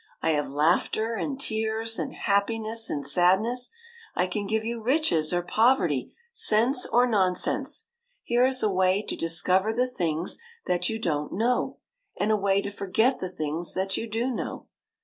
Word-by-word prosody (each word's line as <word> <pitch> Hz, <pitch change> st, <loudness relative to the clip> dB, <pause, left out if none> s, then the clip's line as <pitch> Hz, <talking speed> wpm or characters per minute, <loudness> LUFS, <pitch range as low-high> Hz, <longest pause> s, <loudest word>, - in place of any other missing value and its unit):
I -, -, +1 dB
have 150 Hz, -1 st, 0 dB
laughter 170 Hz, +10 st, +1 dB
and 270 Hz, +4 st, -3 dB
tears 220 Hz, -2 st, -1 dB
and -, -, -3 dB
happiness 220 Hz, +2 st, 0 dB
and 145 Hz, -2 st, -3 dB
sadness; 190 Hz, -, +2 dB, 0.5 s
I 180 Hz, -, +2 dB
can 200 Hz, +2 st, -3 dB
give 220 Hz, +1 st, -1 dB
you 230 Hz, 0 st, -4 dB
riches 220 Hz, -, +2 dB
or 175 Hz, 0 st, 0 dB
poverty, 180 Hz, -, +2 dB, 0.2 s
sense 245 Hz, -, +4 dB
or 245 Hz, +1 st, +3 dB
nonsense; 195 Hz, -, 0 dB, 0.4 s
here 240 Hz, +1 st, +2 dB
is 260 Hz, -1 st, +2 dB
a 215 Hz, -, +2 dB
way 185 Hz, +2 st, +2 dB
to -, -, -4 dB
discover 180 Hz, +5 st, +1 dB
the 245 Hz, +3 st, +1 dB
things 175 Hz, -9 st, -2 dB, 0.3 s
that 180 Hz, 0 st, 0 dB
you 225 Hz, -, -2 dB
don't 150 Hz, -8 st, -2 dB
know, 240 Hz, +4 st, 0 dB, 0.4 s
and 210 Hz, +2 st, +1 dB
a -, -, +4 dB
way 200 Hz, -1 st, +1 dB
to 200 Hz, -, -4 dB
forget 220 Hz, +6 st, 0 dB
the 185 Hz, -, -4 dB
things 160 Hz, 0 st, -4 dB
that 190 Hz, +1 st, -1 dB
you 230 Hz, -, -4 dB
do 230 Hz, +4 st, -1 dB
know. -, -, -5 dB
210 Hz, 170 wpm, -26 LUFS, 180-230 Hz, 0.5 s, sense